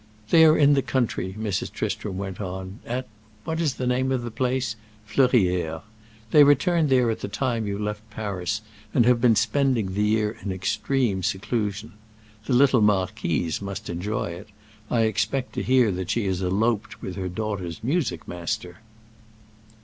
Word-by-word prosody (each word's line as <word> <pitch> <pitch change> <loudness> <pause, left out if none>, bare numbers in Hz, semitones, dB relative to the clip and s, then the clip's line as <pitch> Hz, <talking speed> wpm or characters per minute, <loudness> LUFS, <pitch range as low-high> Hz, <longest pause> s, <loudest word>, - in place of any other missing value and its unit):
"They 160 -1 +8
are 155 0 +6
in 145 -1 +5
the 140 - +3
country," 115 -8 -1
Mrs. 110 -3 -2
Tristram 95 -3 -3
went 95 0 -5
on; 95 +1 -6
"at—what 110 +4 -5
is 150 -6 0
the 130 - -3
name 130 +1 +1
of 130 -2 0
the 120 - -5
place?—Fleurières. 110 -7 0 0.5
They 150 - +8
returned 150 +3 +3
there 125 -3 +4
at 110 - -4
the - - -4
time 115 0 -1
you 100 0 -2
left 105 +1 -4
Paris 105 -1 -3 0.3
and 120 - +5
have 120 -1 +4
been 120 -2 +5
spending 125 -7 +1
the 105 - 0
year 105 +1 +1
in 100 - -3
extreme 95 +3 0
seclusion. 105 +2 -2 0.5
The - - +1
little 130 -1 +5
marquise 95 -5 0
must 100 +1 -5
enjoy 90 +1 -2
it; 90 +5 -9 0.4
I 115 - +2
expect 125 +4 0
to - - -2
hear 125 -4 +3
that 90 -1 -4
she 115 -3 0
has 95 -1 -1
eloped 105 +3 -1
with 90 - -5
her 95 0 -3
daughter's 95 -3 -4
music 130 - -1
master!" 90 +1 -4
110 Hz, 160 wpm, -25 LUFS, 95-125 Hz, 0.5 s, They